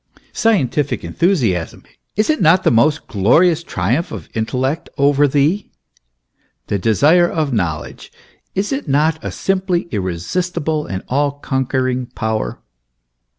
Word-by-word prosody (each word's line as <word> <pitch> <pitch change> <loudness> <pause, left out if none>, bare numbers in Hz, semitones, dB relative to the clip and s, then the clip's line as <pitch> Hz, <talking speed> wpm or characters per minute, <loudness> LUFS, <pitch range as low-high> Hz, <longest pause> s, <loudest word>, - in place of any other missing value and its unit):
Scientific 150 - +1
enthu 175 - 0
siasm 95 - -2 0.3
is 215 +8 +2
it 305 - -2
not 175 +3 +5
the - - +3
most 145 +7 +2
glorious 155 - +3
triumph 125 - -1
of 100 -9 -8
intellect 130 +7 -2
over 145 +1 +4
thee? 150 +8 +1 1.0
The 100 - -2
desire 150 - +4
of 155 -5 -1
knowledge 85 -8 -3 0.4
is 200 +2 -1
it 270 - -4
not 155 +3 +1
a - - -3
simply 185 -2 -1
irresistible, 150 - -2
and 95 -1 -5
all 140 +2 +1
conquering 130 -2 -1
power 110 - -3
145 Hz, 125 wpm, -18 LUFS, 115-170 Hz, 1.0 s, not